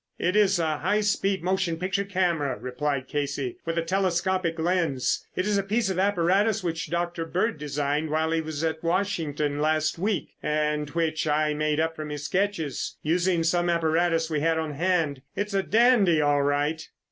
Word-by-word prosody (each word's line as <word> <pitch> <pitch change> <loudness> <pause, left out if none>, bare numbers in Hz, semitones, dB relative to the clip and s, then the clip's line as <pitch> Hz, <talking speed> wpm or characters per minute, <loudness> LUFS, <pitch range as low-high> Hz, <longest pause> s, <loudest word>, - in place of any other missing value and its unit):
"It 180 +3 0
is 200 -2 +4
a 155 -3 0
high 205 +7 +1
speed 195 -2 0
motion 180 -2 0
picture 185 +3 -1
camera," 175 -8 0
replied 130 +1 -3
Casey, 140 -3 -3
"with 165 0 -1
a 165 - +1
telescopic 185 -1 0
lens. 165 -6 0
It 185 - 0
is 210 -1 +2
a - - +2
piece 205 +1 0
of 185 - -2
apparatus 200 +2 +2
which 165 -3 -3
Dr. 170 0 -2
Bird 180 +4 -1
designed 145 +1 -1
while 160 +1 0
he 165 0 +1
was 155 -1 -5
in 160 -1 0
Washington 165 -5 -1
last 155 +1 +1
week 195 -2 -1
and 150 -1 0
which 160 0 -1
I 150 0 +2
made 150 0 0 0.2
from 155 -1 -6
his 150 -1 -5
sketches, 180 -5 -2
using 175 +2 +1
some 175 +1 +1
apparatus 165 0 +1
we 155 -2 -1
had 165 +2 +1
on 160 -2 -2
hand. 160 -4 0
It's 205 0 -3
a 195 - +2
dandy, 215 -6 +4
all 145 -1 +3
right." 145 +3 0
165 Hz, 175 wpm, -26 LUFS, 150-185 Hz, 0.2 s, is